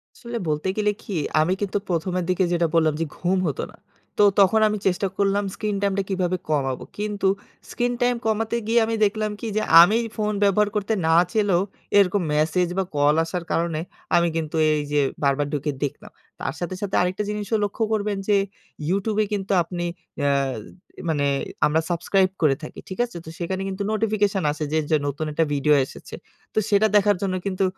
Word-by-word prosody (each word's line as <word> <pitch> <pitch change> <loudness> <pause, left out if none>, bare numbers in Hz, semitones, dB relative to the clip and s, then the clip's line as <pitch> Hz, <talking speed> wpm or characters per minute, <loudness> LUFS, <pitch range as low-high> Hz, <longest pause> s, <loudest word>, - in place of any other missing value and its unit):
আসলে 235 0 -6
বলতে 150 +3 -1
গেলে 210 -1 +2
কি? 210 - -6 0.3
আমি 170 +4 +2
কিন্তু 205 0 -1
প্রথমের 180 +1 -1
দিকে 185 +1 +2
যেটা 170 -1 +2
বললাম 160 -2 +3
যে - - +1
ঘুম 185 +2 0
হতো 145 - -2
না। - - -17 0.4
তো - - +5 0.2
তখন 200 +3 +5
আমি 215 0 -1
চেষ্টা 190 +1 +1
করলাম 200 0 +2
স্ক্রিন 210 -1 -2
টাইম 200 -1 +1
টা - - +1
কিভাবে 185 -1 0
কমাবো? 135 -4 0
কিন্তু 205 -1 -1 0.4
স্ক্রিন 245 0 0
টাইম 245 0 +3
কমাতে 220 +1 0
গিয়ে 235 +1 +4
আমি 225 0 -1
দেখলাম 215 +1 -1
কি? 230 - -5
যে - - +2 0.2
আমি 205 +6 +5 0.2
ফোন 210 -1 -1
ব্যবহার 205 +1 +3
করতে 210 +1 0
না 160 - +4 0.2
চাইলেও 205 -5 +2 0.4
এরকম 200 0 +4
মেসেজ 160 +4 +2
বা 190 - +2
কল 145 +1 +4
আসার 170 +1 -4
কারণে 165 -2 0 0.4
আমি 170 0 +4
কিন্তু 160 -1 -3 0.2
এই 150 -1 +1
যে 145 - +3 0.2
বারবার 140 +1 +2
ঢুকে 150 +1 -1
দেখলাম। 140 - -5 0.3
তার - - -2
সাথে 180 +1 -3
সাথে 200 -2 -2
আরেকটা 180 +3 0
জিনিসও 210 +1 -1
লক্ষ্য 205 +2 -1
করবেন 210 -1 -1
যে 210 - +4 0.5
YoutTube 200 +3 0
এ - - -1
কিন্তু 200 -1 -2
আপনি 175 0 -4 0.3
অ্যা 145 0 +2 0.7
এ - - -6
মানে 145 -3 +1 0.4
আমরা 155 +2 +2
সাবস্ক্রাইব 185 +2 +2
করে 150 -4 +4
থাকি। - - -8
ঠিক 185 - -7
আছে? 235 -7 -10
তো - - -8
সেখানে 185 +2 -2
কিন্তু 195 +1 -3
নোটিফিকেশন 210 -3 +1
আসে 155 +1 -4
যে - - +3
য - - +3
নতুন 145 +2 -3
একটা 160 +2 +1
ভিডিও 145 +1 +3
এসেছে। - - -11 0.4
তো - - +2
সেটা 210 +1 +4
দেখার 205 0 +5
জন্য 190 -2 -1
কিন্তু 195 -1 -1
190 Hz, 190 wpm, -23 LUFS, 165-210 Hz, 0.7 s, তো